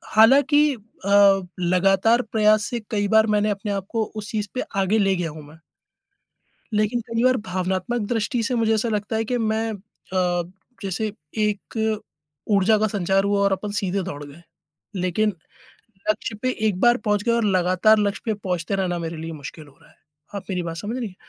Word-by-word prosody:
हालाँकि 280 Hz, +7 st, +6 dB
अ, 200 Hz, -2 st, +3 dB, 0.2 s
लगातार 195 Hz, +6 st, +3 dB
प्रयास 215 Hz, -1 st, +4 dB
से 240 Hz, -, -2 dB
कई 205 Hz, -2 st, 0 dB
बार 220 Hz, +1 st, +4 dB
मैंने 210 Hz, +1 st, +2 dB
अपने 205 Hz, 0 st, -3 dB
आप 195 Hz, -1 st, -2 dB
को 225 Hz, -2 st, 0 dB
उस 210 Hz, -1 st, -6 dB
चीज़ 210 Hz, -2 st, -2 dB
पे 255 Hz, -, -2 dB, 0.2 s
आगे 195 Hz, +3 st, +2 dB
ले 195 Hz, -2 st, +2 dB
गया 175 Hz, -2 st, -2 dB
हूँ 155 Hz, 0 st, -10 dB
मैं। 155 Hz, +2 st, -15 dB, 1.2 s
लेकिन 215 Hz, +3 st, +1 dB
कई 230 Hz, 0 st, -1 dB
बार 255 Hz, 0 st, +4 dB
भावनात्मक 185 Hz, +5 st, -1 dB
दृष्टि 235 Hz, +2 st, 0 dB
से 250 Hz, +3 st, -1 dB
मुझे 225 Hz, -2 st, +2 dB
ऐसा 220 Hz, +2 st, 0 dB
लगता 215 Hz, 0 st, -2 dB
है 225 Hz, -, 0 dB
कि 245 Hz, +2 st, -1 dB
मैं 220 Hz, 0 st, 0 dB
अ, 185 Hz, -3 st, -2 dB, 0.4 s
जैसे 200 Hz, +2 st, -2 dB, 0.3 s
एक 210 Hz, +1 st, -2 dB, 0.8 s
ऊर्जा 200 Hz, +3 st, +4 dB
का 215 Hz, -, +2 dB
संचार 195 Hz, -1 st, +1 dB
हुआ 200 Hz, 0 st, +1 dB
और 200 Hz, -, +2 dB
अपन 195 Hz, +2 st, -2 dB
सीधे 195 Hz, -2 st, -1 dB
दौड़ 145 Hz, -5 st, -6 dB
गए। 145 Hz, +4 st, -13 dB, 0.6 s
लेकिन 185 Hz, +4 st, +1 dB, 0.8 s
लक्ष्य 215 Hz, +1 st, -1 dB
पे 255 Hz, -, +1 dB, 0.2 s
एक 190 Hz, -4 st, -1 dB
बार 240 Hz, +2 st, +5 dB
पहुँच 210 Hz, -1 st, +1 dB
गए 235 Hz, -, +1 dB
और 235 Hz, 0 st, +1 dB
लगातार 185 Hz, +2 st, +3 dB
लक्ष्य 205 Hz, -1 st, -1 dB
पे 220 Hz, -, +1 dB
पहुँचते 185 Hz, -2 st, -3 dB
रहना 180 Hz, -3 st, -1 dB
मेरे 165 Hz, 0 st, -5 dB
लिए 165 Hz, +1 st, -6 dB
मुश्किल 150 Hz, +1 st, -9 dB
हो 145 Hz, -, -20 dB
रहा -, -, -21 dB
है। -, -, -25 dB, 0.4 s
आप 200 Hz, -, -4 dB
मेरी 180 Hz, -2 st, -1 dB
बात 165 Hz, -1 st, -5 dB
समझ 215 Hz, +7 st, -4 dB
रही 245 Hz, -3 st, -3 dB
हैं, 185 Hz, -, -13 dB
205 Hz, 190 wpm, -23 LUFS, 185-220 Hz, 1.2 s, हालाँकि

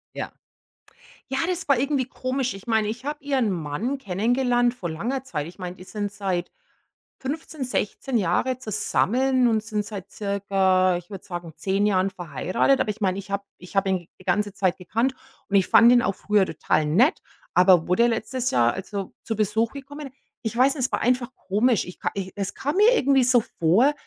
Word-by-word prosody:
Ja. -, -, -4 dB, 1.0 s
Ja, 265 Hz, 0 st, -1 dB
das 365 Hz, 0 st, -2 dB
war 280 Hz, -4 st, +4 dB
irgendwie 275 Hz, -1 st, 0 dB
komisch. 255 Hz, 0 st, -2 dB
Ich 195 Hz, +4 st, -12 dB
meine, 220 Hz, -2 st, +2 dB
ich 235 Hz, +5 st, -6 dB
habe 295 Hz, 0 st, -4 dB
Ihren 265 Hz, -7 st, +1 dB
Mann 180 Hz, -, -2 dB
kennengelernt 245 Hz, +3 st, +1 dB
vor 190 Hz, -9 st, -5 dB
langer 240 Hz, +12 st, -3 dB
Zeit. 155 Hz, -, -4 dB
Ich 175 Hz, -, -12 dB
meine, 180 Hz, -1 st, -5 dB
die 185 Hz, -, -11 dB
sind 205 Hz, 0 st, -4 dB
seit 190 Hz, -3 st, -3 dB, 0.7 s
15, 295 Hz, +1 st, -4 dB
16 250 Hz, +1 st, -2 dB
Jahren 225 Hz, +6 st, +1 dB
zusammen 250 Hz, +3 st, +1 dB
und 220 Hz, -2 st, +1 dB
sind 215 Hz, -2 st, -2 dB
seit 205 Hz, -3 st, -8 dB
circa, 195 Hz, -2 st, +1 dB
ich 175 Hz, +2 st, -9 dB
würde 195 Hz, -2 st, -8 dB
sagen, 175 Hz, -3 st, -6 dB
10 195 Hz, +1 st, 0 dB
Jahren 195 Hz, -2 st, +2 dB
verheiratet, 180 Hz, -, 0 dB
aber -, -, +1 dB
ich 210 Hz, +2 st, -6 dB
meine, 190 Hz, -2 st, 0 dB
ich 200 Hz, 0 st, -8 dB
habe 200 Hz, 0 st, -1 dB, 0.2 s
ich 180 Hz, +2 st, -13 dB
habe 195 Hz, 0 st, +2 dB
ihn 180 Hz, -3 st, -2 dB
die 185 Hz, -, -15 dB
ganze 205 Hz, +2 st, 0 dB
Zeit 185 Hz, -2 st, 0 dB
gekannt 230 Hz, +8 st, -1 dB, 0.3 s
und 200 Hz, -, +2 dB
ich 190 Hz, -, +4 dB
fand 235 Hz, -, +7 dB
ihn 245 Hz, 0 st, +6 dB
auch 195 Hz, -, 0 dB
früher 205 Hz, 0 st, +2 dB
total 155 Hz, -1 st, 0 dB
nett, 235 Hz, -, +3 dB, 0.3 s
aber 180 Hz, -2 st, +5 dB
wo 180 Hz, -, +3 dB
der 235 Hz, -, +5 dB
letztes 250 Hz, +2 st, -1 dB
Jahr, 120 Hz, -1 st, +3 dB
also 195 Hz, 0 st, -5 dB
zu 225 Hz, -, -2 dB
Besuch 220 Hz, +2 st, +1 dB
gekommen 280 Hz, +1 st, -8 dB, 0.3 s
ich 225 Hz, 0 st, -3 dB
weiß 265 Hz, +4 st, +4 dB
nicht, 255 Hz, -3 st, +1 dB
es -, -, -21 dB
war -, -, 0 dB
einfach 245 Hz, 0 st, +1 dB
komisch. 215 Hz, +3 st, +1 dB
Ich 180 Hz, -, -10 dB
ka -, -, -1 dB
i 190 Hz, -1 st, -3 dB
es 200 Hz, -1 st, -3 dB
kam 290 Hz, +5 st, -2 dB
mir 430 Hz, +5 st, +6 dB
irgendwie 275 Hz, -, +3 dB
so 245 Hz, -1 st, +5 dB, 0.2 s
vor, 195 Hz, -, +4 dB
210 Hz, 200 wpm, -24 LUFS, 185-255 Hz, 1.0 s, fand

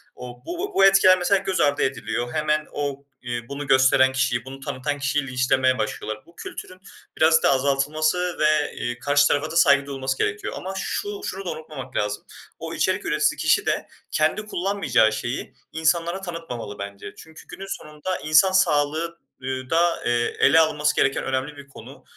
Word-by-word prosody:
O 125 Hz, -1 st, -10 dB
bu 365 Hz, +4 st, -4 dB
bu 195 Hz, -, +5 dB
etkiler 195 Hz, -1 st, +6 dB
mesela 185 Hz, +2 st, +2 dB
göz 190 Hz, -1 st, -2 dB
ardı 145 Hz, 0 st, +2 dB
ediliyor. 120 Hz, -2 st, -2 dB
Hemen 155 Hz, 0 st, 0 dB
o, 140 Hz, -1 st, -4 dB, 0.2 s
iii, 120 Hz, -1 st, -5 dB
bunu 140 Hz, +1 st, -6 dB
gösteren 130 Hz, 0 st, +5 dB
kişiyi, 120 Hz, -2 st, 0 dB
bunu 135 Hz, +1 st, -9 dB
tanıtan 145 Hz, +2 st, -4 dB
kişiyi 140 Hz, 0 st, -1 dB
linçlemeye 130 Hz, 0 st, +1 dB
başlıyorlar. 110 Hz, 0 st, -4 dB
Bu 170 Hz, -, -21 dB
kültürün 185 Hz, 0 st, -9 dB, 0.4 s
birazcık 160 Hz, 0 st, +4 dB
da -, -, +5 dB
azaltılması 155 Hz, +6 st, 0 dB
ve, 155 Hz, -1 st, +2 dB
eee, 120 Hz, 0 st, -4 dB
karşı 145 Hz, +2 st, +3 dB
tarafa 150 Hz, +2 st, 0 dB
da -, -, -6 dB
saygı 140 Hz, -4 st, +5 dB
duyulması 135 Hz, -1 st, -3 dB
gerekiyor. 430 Hz, -2 st, -2 dB
Ama 190 Hz, +1 st, -6 dB
şu 410 Hz, -, -4 dB
şunu 195 Hz, -, -5 dB
da -, -, -3 dB
unutmamak 140 Hz, -5 st, -9 dB
lazım. 105 Hz, 0 st, -2 dB, 0.4 s
O -, -, -6 dB
içerik -, -, 0 dB
üreticisi -, -, +1 dB
kişi -, -, +2 dB
de -, -, -1 dB, 0.2 s
kendi 155 Hz, +8 st, +1 dB
kullanmayacağı 195 Hz, -, +1 dB
şeyi 120 Hz, +4 st, -4 dB, 0.2 s
insanlara 170 Hz, +3 st, 0 dB
tanıtmamalı 165 Hz, -, -7 dB
bence. 100 Hz, 0 st, -7 dB
Çünkü 160 Hz, 0 st, -14 dB
günün 195 Hz, -, -9 dB
sonunda 150 Hz, 0 st, -5 dB
insan 155 Hz, +5 st, +4 dB
sağlığı, 165 Hz, -1 st, +1 dB, 0.2 s
ııı, 130 Hz, 0 st, -4 dB
da, 170 Hz, +1 st, +1 dB
eee, 120 Hz, 0 st, 0 dB
ele 160 Hz, +3 st, +6 dB
alınması 150 Hz, -1 st, +2 dB
gereken 135 Hz, -, +1 dB
önemli 135 Hz, +3 st, -3 dB
bir 140 Hz, 0 st, -12 dB
konu 135 Hz, -, -13 dB
145 Hz, 170 wpm, -23 LUFS, 130-170 Hz, 0.4 s, etkiler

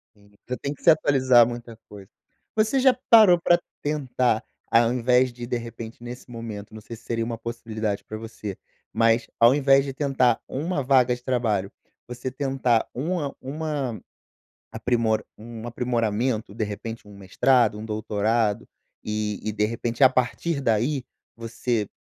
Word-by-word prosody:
Sim, 100 Hz, 0 st, -23 dB, 0.2 s
você 125 Hz, -, -3 dB
tem 140 Hz, +1 st, -4 dB
que -, -, -19 dB
se -, -, +6 dB
atualizar 130 Hz, -6 st, +5 dB
muita 120 Hz, -1 st, -7 dB
coisa. 100 Hz, 0 st, -12 dB, 0.5 s
Você 220 Hz, +5 st, +2 dB
já 260 Hz, -1 st, +5 dB, 0.2 s
parou 210 Hz, -7 st, +8 dB
pra 175 Hz, 0 st, +4 dB, 0.2 s
tentar, 130 Hz, -6 st, 0 dB, 0.3 s
ao 115 Hz, 0 st, +4 dB
invés 125 Hz, +1 st, +2 dB
de 120 Hz, 0 st, -8 dB
de 120 Hz, -, -1 dB
repente 115 Hz, 0 st, -9 dB
nesse 125 Hz, +1 st, -9 dB
momento, 110 Hz, -3 st, -8 dB
não 110 Hz, -, -9 dB
sei 115 Hz, -, -9 dB
se 115 Hz, -, -20 dB
seria 115 Hz, -1 st, -2 dB
uma 115 Hz, 0 st, -4 dB
possibilidade 110 Hz, -3 st, -4 dB
pra 110 Hz, -, -7 dB
você, 110 Hz, -3 st, -7 dB, 0.3 s
mas 115 Hz, 0 st, +2 dB
ao 120 Hz, +3 st, +6 dB
invés 135 Hz, -1 st, +4 dB
de 135 Hz, -, -5 dB
tentar 130 Hz, -4 st, +2 dB
uma 150 Hz, +2 st, -2 dB
vaga 125 Hz, -2 st, +4 dB
de 125 Hz, -, -15 dB
trabalho, 110 Hz, -6 st, 0 dB, 0.4 s
você 125 Hz, +1 st, -5 dB
tentar 130 Hz, -3 st, 0 dB
uma 150 Hz, +2 st, -2 dB
uma 140 Hz, -4 st, -4 dB, 0.7 s
aprimor 115 Hz, -3 st, 0 dB
um 115 Hz, +1 st, -9 dB
aprimoramento, 115 Hz, -2 st, -1 dB
de 110 Hz, -, -1 dB
repente 110 Hz, +2 st, -6 dB
um 100 Hz, -, -13 dB
mestrado, 105 Hz, +3 st, +2 dB
um 110 Hz, -, -7 dB
doutorado 110 Hz, +1 st, 0 dB, 0.4 s
e 105 Hz, -1 st, -2 dB
e, 110 Hz, -, 0 dB
de 105 Hz, 0 st, 0 dB
repente, 115 Hz, +2 st, -4 dB
a 130 Hz, -, +9 dB
partir 135 Hz, +4 st, -1 dB
daí 125 Hz, +4 st, +1 dB, 0.3 s
você 115 Hz, -1 st, -2 dB
120 Hz, 160 wpm, -24 LUFS, 110-130 Hz, 0.7 s, a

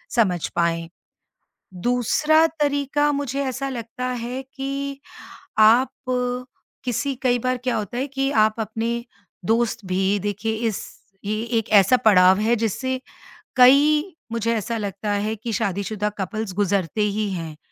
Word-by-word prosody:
समझ 185 Hz, -8 st, +2 dB
पाएँ। 165 Hz, -1 st, 0 dB, 0.9 s
दूसरा 250 Hz, -, +3 dB
तरीका 285 Hz, 0 st, +1 dB
मुझे 280 Hz, -1 st, -2 dB
ऐसा 265 Hz, +1 st, -3 dB
लगता 240 Hz, 0 st, -5 dB, 0.2 s
है 255 Hz, +2 st, -4 dB
कि 275 Hz, 0 st, -4 dB, 0.6 s
आप 230 Hz, +5 st, +6 dB, 0.9 s
किसी 275 Hz, +3 st, -1 dB
कई 245 Hz, -2 st, +3 dB
बार 255 Hz, +1 st, 0 dB
क्या 250 Hz, -, 0 dB
होता 220 Hz, +3 st, -4 dB
है 270 Hz, -, -1 dB
कि 270 Hz, 0 st, -1 dB
आप 215 Hz, -2 st, +4 dB
अपने 225 Hz, +2 st, -2 dB, 0.4 s
दोस्त 230 Hz, -1 st, +1 dB
भी 190 Hz, +2 st, +1 dB
देखिए 210 Hz, +3 st, -2 dB
इस 210 Hz, -, -3 dB, 0.4 s
ये 215 Hz, +1 st, -1 dB, 0.2 s
एक 225 Hz, -, -3 dB
ऐसा 255 Hz, +7 st, +4 dB
पड़ाव 190 Hz, -3 st, +6 dB
है 230 Hz, +2 st, +2 dB
जिससे 255 Hz, +4 st, -2 dB, 0.6 s
कई 285 Hz, +4 st, +6 dB, 0.3 s
मुझे 230 Hz, 0 st, 0 dB
ऐसा 230 Hz, +1 st, -2 dB
लगता 205 Hz, 0 st, -4 dB
है 205 Hz, +2 st, 0 dB
कि 225 Hz, +2 st, -5 dB
शादीशुदा 205 Hz, -1 st, -1 dB
कपल्स 200 Hz, +2 st, -3 dB
गुजरते 200 Hz, 0 st, 0 dB
ही 210 Hz, 0 st, 0 dB
हैं। 165 Hz, -4 st, -5 dB
225 Hz, 135 wpm, -23 LUFS, 205-260 Hz, 0.9 s, आप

